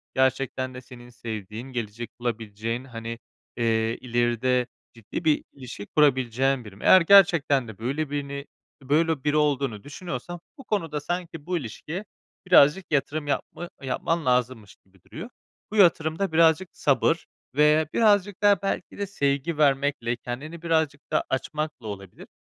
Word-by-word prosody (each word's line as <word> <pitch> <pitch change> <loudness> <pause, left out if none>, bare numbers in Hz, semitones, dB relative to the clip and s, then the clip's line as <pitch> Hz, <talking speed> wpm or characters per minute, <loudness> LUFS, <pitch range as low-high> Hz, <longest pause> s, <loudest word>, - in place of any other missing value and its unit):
gerçekten 130 0 0
de 125 - -8
senin 120 -1 -13
sevdiğin, 110 0 -7
gelecek 115 -1 -5
bulabileceğin, 115 0 -3
hani, 115 -2 -7 0.4
eee, 115 -1 +1
ileride 120 +1 +1 0.3
ciddi 115 +8 -7
bir 155 -2 +3
ilişki 125 -6 -9
kurabileceğin 130 -3 +2
biri 105 -2 -11
mi? 100 - -13
Eğer 185 - +8
gerçekten 170 -8 +5
de 110 -3 -10
böyle 140 +6 -2
birini 140 -1 -4 0.4
böyle 155 +1 +1
biri 150 +1 +2
olduğunu 140 -8 0
düşünüyorsan 175 +2 -6 0.2
bu 270 - -11
konuda 165 - -2
sanki 165 -1 -5
bu 180 -1 -1
ilişkiye 160 - -6 0.4
birazcık 170 +1 +5
yatırım 150 +1 0
yapma 175 +4 -3
yapman 160 +5 -1
lazımmış 125 -4 0
gibi 95 -1 -29
duruyor. 230 - -9 0.4
Bu - - -5
yatırım 165 -4 +4
da 195 -4 0
birazcık 165 +2 +4
sabır 155 +4 +1 0.3
ve 150 +1 +4
birazcık 205 -3 +2
da 205 -1 +5
belki 195 - -3
de 200 -1 -3
sevgi 140 -3 -1
vermekle, 140 -4 +2
kendini 145 +8 -7
birazcık 160 -4 0
da - - +2
açmakla 150 -2 -3
olabilir. 100 -2 -9
140 Hz, 140 wpm, -25 LUFS, 120-160 Hz, 0.4 s, Eğer